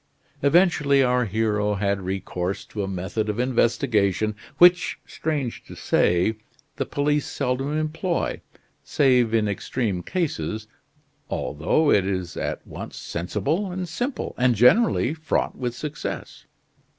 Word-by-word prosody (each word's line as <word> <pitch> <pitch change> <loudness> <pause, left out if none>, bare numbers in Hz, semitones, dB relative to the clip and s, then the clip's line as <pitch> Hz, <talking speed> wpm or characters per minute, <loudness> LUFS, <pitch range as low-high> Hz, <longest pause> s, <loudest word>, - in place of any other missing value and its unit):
Eventually 145 -3 +4
our 125 -1 +2
hero 105 0 0
had 100 0 0
recourse 95 0 -3
to 105 - -5
a 95 - -2
method 95 +3 -3
of 105 - -2
investigation 110 -4 +1 0.2
which, 180 0 +5
strange 145 -6 -3
to - - -11
say, 90 +6 +2 0.4
the - - -2
police 145 0 0
seldom 135 +4 -1
employ, 165 +3 -2 0.4
save 125 -5 +3
in 110 -2 +2
extreme 100 -1 -2
cases, 110 - -2 0.6
although 85 - +1
it 95 -2 +3
is 95 -4 -3
at - - -4
once - - -8
sensible 125 - -2
and 180 0 -4
simple, 245 - -3
and 125 -1 +4
generally 130 - +4
fraught 160 0 -1
with 120 -2 -3
success. 150 +2 -6
120 Hz, 125 wpm, -24 LUFS, 100-150 Hz, 0.6 s, which